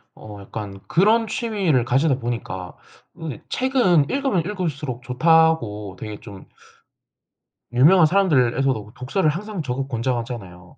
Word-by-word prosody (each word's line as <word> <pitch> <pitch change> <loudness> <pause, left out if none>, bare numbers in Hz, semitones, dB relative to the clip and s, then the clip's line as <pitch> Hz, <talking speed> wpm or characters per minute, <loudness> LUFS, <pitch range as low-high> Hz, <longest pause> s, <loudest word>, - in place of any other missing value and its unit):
어 105 -2 -11
약간 100 -1 -8
그런 220 +6 +3
취미를 200 - 0
가지다 135 +2 +2
보니까 115 -7 -5 0.5
으 155 -7 -5
책은 240 - +2
읽으면 270 -9 +1
읽을수록 155 - -4
좋다고 125 - +2
되게 105 -2 -7
좀 100 -2 -12 1.3
유명한 160 +8 +6
사람들에서도 135 - +1
독서를 155 +7 0
항상 195 +4 -4
적극 135 0 -3
권장하잖아요. 115 -8 -4
135 Hz, 290 characters per minute, -22 LUFS, 115-175 Hz, 1.3 s, 유명한